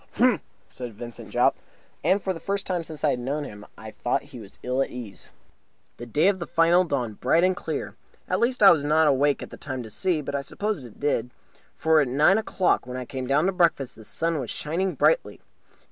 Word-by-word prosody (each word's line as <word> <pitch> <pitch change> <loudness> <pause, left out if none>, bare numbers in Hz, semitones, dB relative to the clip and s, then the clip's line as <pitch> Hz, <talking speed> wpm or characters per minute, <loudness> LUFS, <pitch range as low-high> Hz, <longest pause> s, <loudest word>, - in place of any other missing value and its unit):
"H'm!" 245 -3 +3 0.3
said 120 -4 -8
Vincent 120 +2 -9
Jopp. - - +3 0.5
And 195 +1 +2
for 190 - 0
the 165 - -8
first 200 +2 -2
time 180 -3 -1
since 160 -2 -9
I 150 - +4
had 125 - -2
known 140 +5 -2
him 105 -6 -9
I - - -9
thought - - -1
that - - -19
he - - -10
was - - -11
ill 125 +2 0
at - - 0
ease. 115 -6 -9 0.7
The 120 - -8
day 150 - +2
of 200 -2 +2
the 170 - -5
final 170 +2 +4
dawned 125 - -3
bright 160 +7 +3
and 185 0 +3
clear. - - -4 0.3
At - - 0
least, 240 -1 +1
I 195 - +10
was 155 -4 +2
not 155 +2 +3
awake 145 0 +2
at - - -10
the - - -9
time 130 -4 -5
to 110 - -10
see, 175 - 0
but 140 0 -5
I 140 - 0
suppose 205 +2 -3
it 120 -4 -13
did; 125 -5 0 0.5
for 160 -1 +3
at 140 - +1
nine 150 - +4
o'clock, 190 - 0
when 125 0 -5
I 125 - -5
came 130 -1 -5
down 145 +5 +3
to 190 - +2
breakfast, 170 -8 +1
the 110 - -13
sun 165 +7 -1
was 125 -5 -5
shining 180 +5 -2
brightly. - - +2
150 Hz, 235 wpm, -25 LUFS, 125-180 Hz, 0.7 s, I